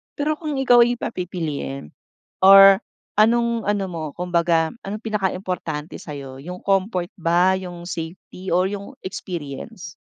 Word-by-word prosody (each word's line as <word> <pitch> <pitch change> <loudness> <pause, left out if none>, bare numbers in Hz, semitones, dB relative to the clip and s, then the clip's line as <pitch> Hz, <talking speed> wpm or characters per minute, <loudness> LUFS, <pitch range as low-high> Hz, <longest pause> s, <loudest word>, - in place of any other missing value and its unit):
Pero 305 +1 -1
kung 305 -3 -3
ikaw 250 -2 +5
ay 240 - 0
papipiliin, 165 - -5 0.5
or 195 0 +9 0.3
anong 235 +2 +3
ano 205 -1 0
mo, 170 -3 -6 0.2
kumbaga, 170 -1 +1
anong 200 +2 -5
pinakaimportante 185 -7 -3
sa'yo, 140 -5 -8
yung 180 +4 -7
comfort 190 -2 0
ba, 175 +2 +2
yung 175 -2 -6
safety 175 +2 -7
or 180 +2 +3
yung 205 +7 -6
experience? 170 +1 -7
185 Hz, 125 wpm, -22 LUFS, 170-205 Hz, 0.5 s, or